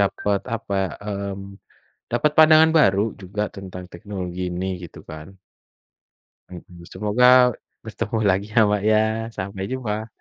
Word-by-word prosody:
dapat 100 0 0 0.2
apa, 100 -3 -6 0.3
mmm, 100 -1 -5 0.7
dapat 120 +6 +2
pandangan 160 0 +7
baru 100 -7 +4 0.2
juga 100 +3 -4
tentang 90 -2 -8
teknologi 90 -1 -5
ini 90 +2 -3 0.2
gitu 85 - -12
kan. 80 +4 -10 1.2
Hmm 90 -1 -10 0.2
semoga 105 +6 +1 0.6
bertemu 105 - -5
lagi 95 +2 +1
ya 115 - +4
Mbak 105 -1 0
ya, 110 - +4 0.4
sampai 95 0 -5
jumpa. 110 -4 -3
100 Hz, 125 wpm, -22 LUFS, 95-105 Hz, 1.2 s, pandangan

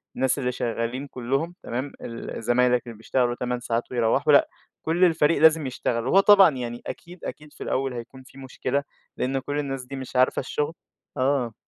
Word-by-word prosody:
الناس 130 +2 +1
اللي 125 -1 0
شغالين 120 +3 -3
كلّهم 135 +8 -2
تمام، 130 +4 -4
ال 115 -1 -6
زمايلك 125 +1 +3
اللي 115 -2 -8
بيشتغلوا 120 +2 0
8 125 0 -2
ساعات 120 -1 -1
ويروَّحوا، 120 -3 +2
لأ - - +6 0.3
كلّ 170 +3 +1
الفريق 160 -2 +3
لازم 160 -2 +5
يشتغل، 120 -1 -2
وهو 190 +8 +5
طبعًا 195 -2 +8
يعني 120 -1 -5
أكيد، 175 +1 -9
أكيد 150 0 -8
في - - -8
الأول 135 0 -1
هيكون 125 +2 -9
في 130 - -18
مشكلة، 135 +1 -2 0.3
لإن 135 +1 0
كلّ 145 +2 -3
الناس 135 -3 -3
دي 135 +2 -7
مش 130 -1 -8
عارفة 130 +1 +3
الشغل، 145 +3 -2 0.4
آه. 130 -3 +1
130 Hz, 180 wpm, -25 LUFS, 120-145 Hz, 0.4 s, طبعًا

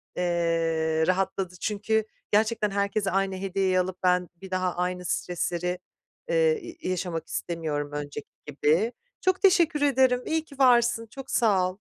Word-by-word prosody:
eee, 165 -2 +1
rahatladı. 190 0 0
Çünkü 220 +1 0 0.3
gerçekten 215 0 +2
herkese 200 0 0
aynı 195 0 0
hediyeyi 190 -1 +1
alıp 185 0 -2
ben 180 -1 +2
bir 190 +2 -12
daha 185 -1 0
aynı 180 0 -2
stresleri, 180 +1 -2 0.5
eee, 480 -2 +3
i 335 - -7
yaşamak 180 -3 -3
istemiyorum 155 -4 -3
önceki 145 0 -5 0.2
gibi. 155 +9 +1 0.3
Çok 370 -2 +1
teşekkür 340 -6 +4
ederim, 260 -3 +3
iyi 320 0 0
ki 280 -2 -15
varsın, 240 -3 +4
çok 270 -1 -9
sağ 195 -6 +3
ol. 185 - -16
190 Hz, 140 wpm, -26 LUFS, 175-235 Hz, 0.5 s, teşekkür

